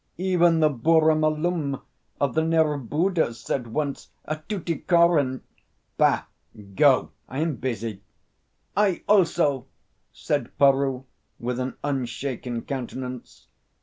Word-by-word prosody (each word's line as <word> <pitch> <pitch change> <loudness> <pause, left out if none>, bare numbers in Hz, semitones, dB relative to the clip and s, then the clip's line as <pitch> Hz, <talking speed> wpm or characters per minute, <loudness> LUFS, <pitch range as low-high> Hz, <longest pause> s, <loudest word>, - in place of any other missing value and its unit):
Even 175 -2 +3
the 155 - +5
Burra 155 +4 +3
Malum 155 -1 0 0.4
of 140 -3 +1
the 160 - +2
Nerbudda 160 -1 +1
said 125 +1 -3
once 140 +4 -3 0.2
at 155 +2 -6
Tuticorin 170 -7 +2 0.3
" - - -46
"Bah! - - +4 0.5
Go! - - +4 0.2
I 130 - -6
am 155 -3 -1
busy." 115 -5 -4 0.7
"I, 200 -3 +2
also!" 165 -9 +3 0.4
said 145 -5 -3
Peroo, 135 -2 +3 0.4
with 125 +1 -3
an 130 +1 -3
unshaken 125 -3 -3
countenance. 130 -2 -6
145 Hz, 110 wpm, -25 LUFS, 130-165 Hz, 0.7 s, the